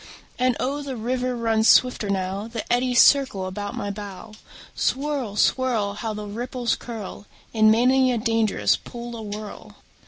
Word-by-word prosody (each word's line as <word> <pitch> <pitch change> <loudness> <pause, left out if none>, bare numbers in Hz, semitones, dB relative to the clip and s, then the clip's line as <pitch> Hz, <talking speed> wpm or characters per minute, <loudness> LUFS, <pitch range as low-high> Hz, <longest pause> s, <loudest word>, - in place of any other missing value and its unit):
And 255 -2 +2
oh, 280 +3 -2
the 275 -2 -5
river 250 +2 -2
runs 225 -1 +1
swifter 250 -5 +4
now; 195 +2 -2
The 230 -1 -5
eddies 245 0 +2
circle 260 -9 +4
about 205 +2 -5
my 205 - -3
bow. 200 0 -9 0.4
Swirl, 275 -6 -1
swirl! 225 -3 +1
How 220 +2 -4
the 210 0 -6
ripples 240 +3 -2
curl 210 -3 -8 0.3
In 215 -1 +5
many 255 +3 +4
a 245 - 0
dangerous 225 -2 +1
pool 240 0 -8
awhirl! 210 -1 -8
230 Hz, 150 wpm, -23 LUFS, 210-250 Hz, 0.4 s, In